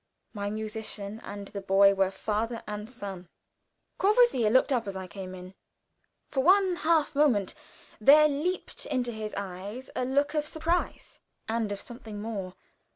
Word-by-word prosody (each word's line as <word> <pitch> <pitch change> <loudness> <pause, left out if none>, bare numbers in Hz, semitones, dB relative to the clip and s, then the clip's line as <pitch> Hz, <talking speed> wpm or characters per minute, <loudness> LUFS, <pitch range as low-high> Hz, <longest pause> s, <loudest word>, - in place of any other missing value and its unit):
My 205 -2 -3
musician 215 0 -5
and 200 0 -7
the 200 - -6
boy 195 +1 +5
were 195 -1 +2
father 220 +4 -2
and 210 +1 -6
son. 195 -8 -8 0.7
Courvoisier 415 - +4
looked 260 +4 +4
up 230 -4 0
as 195 - -4
I 190 0 -5
came 185 +1 -8
in. 185 +1 -10 0.7
For 270 - 0
one 375 +1 +5
half 320 -2 +2
moment 255 -10 +3 0.5
there 300 +7 +7
leaped 305 +6 -3
into 245 -2 -1
his 215 -1 -5
eyes 200 +6 -6
a - - 0
look 280 +4 +1
of 300 -1 +1
surprise 325 +3 -2 0.3
and 225 -2 -1
of 200 - -3
something 225 -3 -8
more. 205 -4 -5
220 Hz, 155 wpm, -28 LUFS, 200-280 Hz, 0.7 s, there